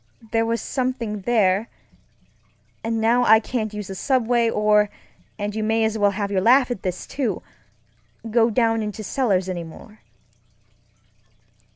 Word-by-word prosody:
There 225 0 +1
was 230 0 -1
something 250 -5 -3
thereŌĆöand 210 -1 +2 1.2
now 230 +2 +2
I 220 -2 +6
can't 220 -1 -3
use 210 -1 -6
the 195 - -7
subway 240 +1 +1
or 210 -1 +3 0.5
(and 205 0 -3
you 220 - -2
may 225 +1 +1
as 220 0 0
well 205 -2 +3
have 200 0 -3
your 190 -2 +1
laugh 250 +4 +4
at 240 - -4
this, 180 -1 -4
too) 245 -9 -3 0.9
go 230 0 +4
down 225 0 +1
into 215 0 -5
cellars 200 -6 0
any 180 -2 -4
more. 210 +6 -13
220 Hz, 145 wpm, -22 LUFS, 205-235 Hz, 1.2 s, I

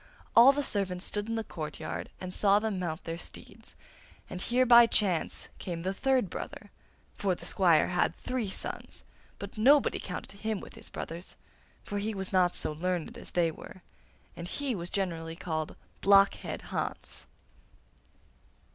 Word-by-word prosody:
All 240 +4 +10
the 285 +1 -1
servants 190 -6 0
stood 205 +1 -1
in 230 - -1
the 225 - -1
courtyard 155 -7 -5
and 185 -1 -6
saw 200 0 +4
them 210 -3 -1
mount 170 -2 -3
their 165 0 -5
steeds, - - -11 0.6
and 180 - -5
here 250 +4 +3
by 235 -1 +8
chance 190 -7 +1
came 170 -2 -4
the 190 +3 -1
third 260 0 +2
brother; 205 +4 -7 0.4
for 190 -3 0
the - - -11
squire 175 -5 +3
had 180 -1 +1
three 250 -5 -3
sons, - - -5 0.3
but 200 +2 -8
nobody 280 +6 +5
counted 200 - -7
him 215 -1 -2
with - - -11
his - - -12
brothers, 170 +3 -7 0.5
for 205 - -3
he 215 +1 -2
was 190 0 -1
not 180 -1 +3
so - - -1
learned 180 +6 -2
as 235 - -9
they 170 -2 +2
were, 185 +3 -12 0.5
and 170 - -6
he 275 +6 -1
was 175 -4 -5
generally 165 -5 -2
called 155 -2 -3 0.3
'Blockhead 195 0 +4
Hans. - - -4
195 Hz, 160 wpm, -30 LUFS, 175-220 Hz, 0.6 s, All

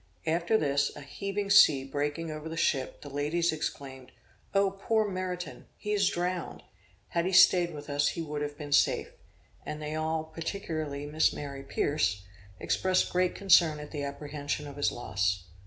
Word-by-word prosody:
After 170 +6 +2
this, 140 -4 +1
a 145 - -9
heavy 200 +8 -4
sea 150 -9 +7
breaking 145 +4 -2
over 155 +1 -6
the 165 - -6
ship, 135 -5 0
the 145 - -9
ladies 150 +5 0
exclaimed, 140 -4 -5 0.4
"O 195 -1 +4
poor 215 +2 0
Meriton! 185 -2 -5
he 210 - -3
is 200 -2 +3
drowned! 175 0 -3 0.5
had 170 +1 0
he - - -1
staid 180 -1 +6
with 145 -2 -9
us 145 0 +1
he 170 - -2
would 150 -1 -4
have 145 0 -4
been 145 -1 -7
safe!" 145 - +3 0.5
and 150 0 -5
they 150 0 -4
all, 155 0 -1
particularly 160 -3 -4
Miss 155 +2 +2
Mary 140 -2 -6
Pierce, 135 -7 0 0.4
expressed 185 0 +1
great 180 0 +1
concern 170 -5 +5
at 150 0 -9
the 150 - -4
apprehension 145 +1 -4
of 140 -1 -9
his 145 - +2
loss. 95 -5 -1
155 Hz, 170 wpm, -29 LUFS, 145-180 Hz, 0.5 s, sea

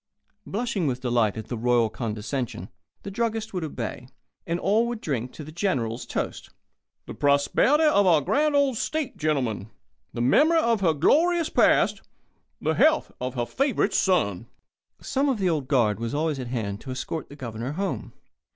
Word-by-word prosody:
Blushing 210 -5 -1
with 130 -1 -2
delight 120 -4 +1
at 110 - -5
the 120 - -5
royal 120 0 +2
condescension, 110 -2 -4 0.3
the 200 - -6
druggist 225 0 -2
would 180 -3 -2
obey, 125 -4 -5 0.4
and 170 +1 -1
all 215 +6 +2
would 240 -2 -4
drink 130 - -3
to 155 - -9
the 155 - -10
General's 130 - -2
toast: - - -4 0.6
"The - - -7
prosperity 145 - +3
of 205 -11 +4
our 165 -4 +6
grand 295 - +1
old 280 -4 +2
state, 310 +1 -2
gentlemen 125 - -1 0.4
the - - -6
memory 290 - +4
of 235 -9 +2
her 165 -4 +3
glorious 330 - +3
past - - +3 0.6
the - - 0
health 315 0 +3
of 125 +1 -3
her 120 -1 -1
Favourite 265 - 0
Son." 115 - +1 0.5
Some 275 +2 -1
one 275 - +3
of - - -8
the 185 -3 +2
Old 150 -5 -2
Guard 115 -7 +2
was 115 +4 -3
always 155 -2 -1
at 125 - -5
hand 110 -5 -3
to - - -10
escort 130 +4 -4
the 145 - -11
Governor 120 -1 -5
home. 195 +4 -3
150 Hz, 175 wpm, -25 LUFS, -, 0.6 s, our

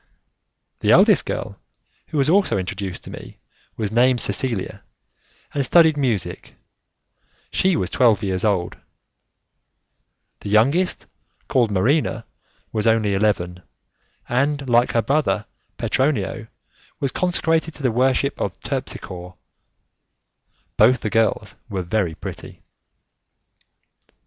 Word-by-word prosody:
The - - -1
eldest - - +5
girl, - - -4 0.5
who 155 - -4
was 140 -1 +2
also 190 - +3
introduced 95 0 -5
to - - -10
me, - - -10 0.4
was 105 -2 -2
named 125 +2 +3
Cecilia, 105 -1 -1 0.7
and 140 - 0
studied 160 +3 +5
music; 125 - -2 1.0
she 190 -1 +2
was - - -2
twelve 115 -7 +3
years 95 -2 -1
old; 95 -5 0 1.6
the - - -7
youngest, 140 - +2 0.4
called 120 -4 +2
Marina, 115 +4 +1 0.5
was 110 0 -1
only 110 -3 +2
eleven, 90 -3 0 0.7
and 140 +3 0
like 120 0 +3
her 115 - +2
brother 140 -4 0 0.3
Petronio 130 -5 -1 0.5
was 135 -2 -1
consecrated 165 -3 0
to 145 - -10
the 130 - +2
worship 130 +3 +1
of - - -3
Terpsichore. 90 0 -6 1.4
Both 125 -1 +5
the 105 - -3
girls 110 -2 +1 0.2
were 95 -3 -3
very 90 -2 -1
pretty. - - -9
115 Hz, 110 wpm, -21 LUFS, 100-140 Hz, 1.6 s, eldest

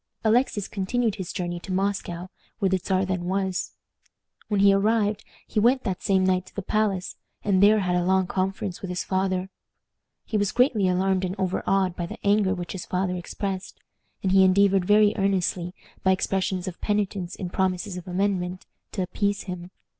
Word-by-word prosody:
Alexis 220 -2 +2
continued 220 +3 0
his 185 -2 -5
journey 175 -2 -3
to 190 - -8
Moscow, 185 -2 -2 0.3
where 195 -4 +1
the 190 0 +1
Czar 190 +1 0
then 185 -2 -2
was. 190 0 -1 0.7
When 205 -2 0
he 200 0 +7
arrived 210 +1 +1 0.2
he 215 - -1
went 250 +4 +3
that 190 -5 -3
same 190 -2 +2
night 185 0 +1
to - - -17
the 200 - -3
palace, 200 -3 -1 0.3
and 195 -2 +2
there 210 +1 +6
had 180 -2 0
a 180 - +2
long 190 +1 +3
conference 190 0 -2
with 190 - -5
his 180 0 -2
father. 190 0 -1 0.7
He 215 - -1
was 205 -1 +1
greatly 245 -6 +3
alarmed 185 +1 +1
and 185 0 -2
overawed 190 0 +1
by 175 - -3
the - - -8
anger 200 -1 +3
which 175 -2 -5
his 190 - -6
father 180 0 -1
expressed, 190 +2 -5 0.4
and 190 - +1
he 190 0 +6
endeavored 195 0 +4
very 210 +1 +5
earnestly, 185 -2 0 0.3
by 190 - +4
expressions 190 0 -1
of 180 - -7
penitence 200 -3 -1
and 180 -2 -6
promises 190 +1 -1
of 180 0 -8
amendment, 185 -1 -1 0.3
to 190 - -1
appease 200 +2 -1
him. 180 -1 -6
190 Hz, 180 wpm, -25 LUFS, 185-200 Hz, 0.7 s, he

